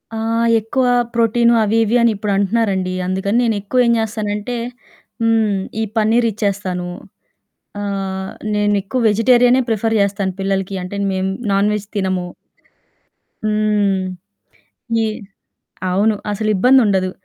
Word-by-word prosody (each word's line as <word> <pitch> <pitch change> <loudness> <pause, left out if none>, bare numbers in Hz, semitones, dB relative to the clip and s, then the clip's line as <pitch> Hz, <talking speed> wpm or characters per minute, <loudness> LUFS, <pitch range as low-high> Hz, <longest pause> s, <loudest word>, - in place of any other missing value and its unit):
ఆహ్, 230 +1 0
ఎక్కువ 240 +4 -1 0.3
ప్రోటీను 235 0 +3
అవి 215 +2 +1
ఇవి 225 +3 +2
అని 235 -1 +4
ఇప్పుడంటున్నారండి. 200 -2 0
అందుకని 190 +4 0
నేనెక్కువ 225 +3 +1
ఏం - - +4
చేస్తానంటే 215 +1 -3 0.7
హ్మ్. 225 -2 +2 0.3
ఈ - - +1
పన్నీర్ 225 +2 +3
ఇచ్చేస్తాను. 195 -4 -2 0.9
ఆహ్, 195 -1 -3 0.2
నేను 205 0 +2
ఎక్కువ 220 +6 -3
వెజిటేరియనే 245 +4 +4
ప్రిఫర్ 225 0 0
చేస్తాను 200 -1 -1
పిల్లలకి. 195 0 -1
అంటే 185 +3 -6 0.2
మేము 190 0 -1 0.2
నాన్ 200 +1 +2
వెజ్ 210 -1 -4
తినము. 185 -2 -1 1.2
హ్మ్. 210 -2 +1 1.0
ఈ - - +1 0.9
అవును. 210 +3 +2 0.2
అసలిబ్బందుండదు. 210 -2 +3
210 Hz, 110 wpm, -18 LUFS, 195-225 Hz, 1.2 s, అని